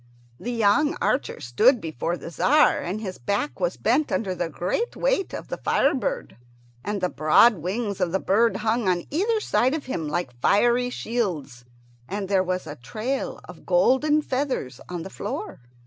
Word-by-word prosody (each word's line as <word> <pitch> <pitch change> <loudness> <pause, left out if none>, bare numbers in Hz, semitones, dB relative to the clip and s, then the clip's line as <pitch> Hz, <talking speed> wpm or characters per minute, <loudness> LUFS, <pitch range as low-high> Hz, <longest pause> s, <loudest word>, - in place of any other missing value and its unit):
The 245 - -4
young 240 +6 +2
archer 265 - 0
stood 225 - +3
before 165 - -3
the 165 - -8
Tzar, 295 - +4
and 185 +5 -3
his 190 -4 -6
back 200 - -2
was 175 -1 -1
bent 260 +7 +1
under 195 -4 -1
the 175 -2 -3
great 180 - -2
weight - - 0
of - - -7
the - - -3
fire - - +2
bird, - - -3 0.5
and 205 -1 -3
the 180 - +2
broad 175 +8 +5
wings 200 +3 -3
of 180 -2 +1
the 190 - +2
bird 225 +5 +2
hung 225 -1 +1
on 175 -1 0
either 425 +9 +1
side 260 - +1
of 310 - -5
him 165 -12 -3
like 150 -4 -2
fiery 240 - +3
shields, 170 - -3 0.4
and 195 -1 -3
there 190 -2 +3
was 185 0 -2
a 150 -1 -8
trail 220 - -4
of - - -13
golden 300 - +3
feathers 255 - -2
on 175 -2 -4
the 190 - -9
floor. 210 - -5
210 Hz, 180 wpm, -24 LUFS, 175-260 Hz, 0.5 s, broad